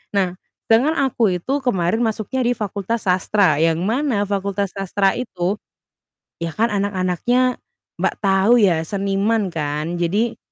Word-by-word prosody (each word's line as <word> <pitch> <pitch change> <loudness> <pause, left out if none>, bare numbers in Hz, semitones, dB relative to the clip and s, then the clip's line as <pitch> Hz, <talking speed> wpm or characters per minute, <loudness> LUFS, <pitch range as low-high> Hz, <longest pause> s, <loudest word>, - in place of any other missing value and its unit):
Nah, 185 -3 +1 0.4
sedangkan 265 +8 +4
aku 230 -8 +1
itu 270 +11 -2
kemarin 195 -2 +1
masuknya 225 +3 -1
di 245 - +3
fakultas 210 +1 -3
sastra, 180 -3 +3
yang 165 -1 +3
mana 230 -1 0
fakultas 200 -1 -2
sastra 195 0 0
itu, 200 -5 -2 0.8
ya 165 -1 -2
kan 230 +2 +1
anak-anaknya 200 +6 0 0.4
Mbak, - - +1
tahu 200 +4 +4
ya 170 -5 +3
seniman 200 +2 0
kan, 150 +2 -2
jadi 210 +7 0
200 Hz, 130 wpm, -20 LUFS, 185-230 Hz, 0.8 s, sedangkan